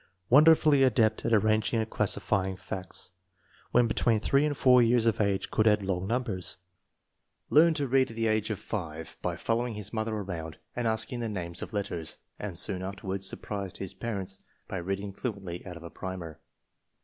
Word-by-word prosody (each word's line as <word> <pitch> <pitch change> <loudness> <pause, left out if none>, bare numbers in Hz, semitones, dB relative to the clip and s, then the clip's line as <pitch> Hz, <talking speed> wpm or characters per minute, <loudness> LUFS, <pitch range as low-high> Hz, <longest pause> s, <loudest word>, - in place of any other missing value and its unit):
Wonderfully 150 0 +6
adept 115 -4 +3
at - - +1
arranging 110 +1 +3
and 110 - -1
classifying 95 -2 0
facts. 95 0 -5 0.6
When 120 0 +5
between 115 0 +2
three 140 +6 +2
and 145 -2 -2
four 125 -1 +6
years 120 0 +3
of 115 -1 +2
age 100 -2 0
could 110 - +2
add 105 -1 +4
long 95 -1 -2
numbers. 115 -6 -2 0.9
Learned 160 +2 +6
to 145 -3 -1
read 130 +1 +3
at 115 - -9
the 115 0 -1
age 110 -1 +1
of 110 - -2
5 80 -7 -5
by - - -1
following 115 0 -1
his 105 +1 -6
mother 110 0 -1
around 85 -7 -5 0.2
and 120 -1 -1
asking 110 +2 +1
the 115 -1 -2
names 85 -4 -5
of - - -6
letters, 90 -7 -4 0.2
and 100 -5 -5
soon 95 0 +2
afterward 95 0 -4
surprised 100 -1 -3
his 95 - -5
parents 100 -5 -4 0.3
by - - -4
reading 95 +3 -3
fluently 95 -6 -5
out 90 -1 -7
of 85 - -12
a 85 - -9
primer. 85 -4 -7
105 Hz, 180 wpm, -29 LUFS, 95-115 Hz, 0.9 s, Wonderfully